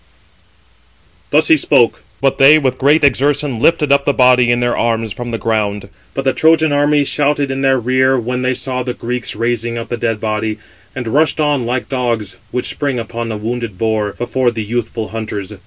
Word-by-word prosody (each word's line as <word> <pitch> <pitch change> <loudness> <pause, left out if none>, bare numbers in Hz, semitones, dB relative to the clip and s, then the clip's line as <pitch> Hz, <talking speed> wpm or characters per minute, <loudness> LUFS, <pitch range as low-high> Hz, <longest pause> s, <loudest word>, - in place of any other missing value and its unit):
Thus - - +3
he 320 - +6
spoke; 130 - +2 0.2
but 135 -1 +1
they 145 +3 +7
with 130 -4 -1
great 145 +3 +3
exertion 140 -2 +1
lifted 150 +1 +2
up 140 0 +4
the 145 - +1
body 125 -1 +4
in 120 0 +2
their 120 0 0
arms 115 -2 -1
from 120 0 -6
the 115 - -3
ground: 105 -2 -2 0.3
but 135 - -3
the 135 - +2
Trojan 160 -1 +3
army 145 0 +2
shouted 145 -1 0
in 135 0 -3
their 135 -1 +3
rear 130 +2 +2
when 125 +1 -2
they 130 0 0
saw 125 0 -3
the 125 -1 -4
Greeks 125 +1 -3
raising 120 0 -2
up 115 - -6
the 120 - -3
dead 115 -2 -2
body, 110 0 -2 0.4
and 125 -3 -5
rushed 150 +7 +1
on 145 -5 0
like 125 +1 -2
dogs, 120 -6 -2
which 125 - -2
spring 140 -3 -2
upon 115 0 -4
a 110 - -4
wounded 115 -2 -4
boar, 110 -2 -1
before 125 +1 -1
the 115 -2 -4
youthful 115 0 -3
hunters. 110 -3 -5
125 Hz, 195 wpm, -16 LUFS, 115-135 Hz, 0.4 s, they